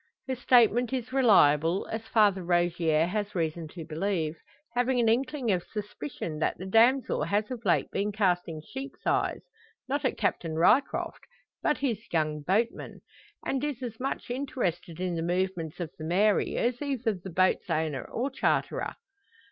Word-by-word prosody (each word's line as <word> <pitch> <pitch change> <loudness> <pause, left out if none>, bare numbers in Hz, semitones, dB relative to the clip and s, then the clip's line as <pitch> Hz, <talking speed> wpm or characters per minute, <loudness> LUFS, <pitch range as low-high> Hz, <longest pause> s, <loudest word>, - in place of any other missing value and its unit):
Her 260 - -1
statement 245 -1 +4
is 255 0 -3
reliable, 175 - +4
as 225 0 -4
Father 205 -5 +3
Rogier 170 -2 +2
has 205 +3 -3
reason 165 -1 -2
to 165 +1 -9
believe 165 -1 -1 0.4
having 245 +1 +1
an 235 - +3
inkling 255 +1 +1
of 180 -2 +1
suspicion 170 -6 -6
that - - 0
the 185 - -7
damsel 230 - +3
has 205 +7 0
of 240 -2 -5
late 175 - +2
been 205 +1 -1
casting 180 -6 0
sheep's 270 - -8
eyes, - - 0 0.4
not 285 +2 -1
at 260 - 0
Captain 165 -6 -1
Ryecroft, 180 - +2 0.4
but 300 - +1
his 250 -7 -1
young 155 -2 0
boatman, 215 +9 -1 0.4
and 270 0 -1
is 280 -4 -3
as 225 -3 -6
much 260 -1 -3
interested 180 - -3
in 180 -1 -1
the 165 - -2
movements 175 -2 -2
of 170 -3 -4
the - - -6
Mary 195 +6 +2
as 245 +2 0
either 260 -6 -1
the 190 0 -8
boat's 185 +1 +1
owner 155 -5 -1
or 260 +4 -3
charterer. - - 0
200 Hz, 160 wpm, -28 LUFS, 170-245 Hz, 0.4 s, statement